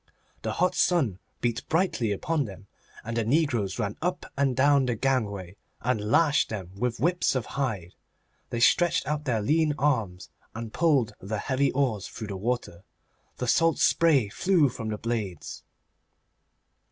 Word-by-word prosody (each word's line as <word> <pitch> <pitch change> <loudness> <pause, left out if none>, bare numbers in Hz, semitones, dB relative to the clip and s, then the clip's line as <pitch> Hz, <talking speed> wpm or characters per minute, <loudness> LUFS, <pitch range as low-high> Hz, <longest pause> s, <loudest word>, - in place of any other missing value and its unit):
The - - -2
hot 180 +1 +1
sun 135 - +1 0.2
beat 120 -2 -1
brightly 160 - +1
upon 150 +8 -1
them, 100 -1 -10 0.4
and 115 +1 -5
the 115 - +1
negroes 120 -6 +1
ran 105 -3 -3
up 180 +2 -2
and 135 -2 +1
down 140 0 +4
the 120 - 0
gangway 105 -7 -1 0.2
and 115 -3 -1
lashed 160 +4 +3
them 95 -5 -6
with 120 +3 -2
whips 175 -1 +1
of 125 -4 -1
hide. 110 -10 -2 0.6
They 120 - -3
stretched 175 +6 +3
out 150 +1 -2
their 115 -6 0
lean 155 +3 +2
arms 115 -11 -1 0.2
and 115 -1 -6
pulled 140 -10 +2
the 105 +3 -4
heavy 135 +5 0
oars 125 -8 0
through 110 -2 -8
the 100 - -4
water. 100 -5 -3 0.5
The 125 - -3
salt 165 +7 +3
spray 145 -10 +3
flew 175 - +2
from 115 -2 -6
the 105 - -3
blades. 105 -7 -4
125 Hz, 155 wpm, -27 LUFS, 105-145 Hz, 0.6 s, down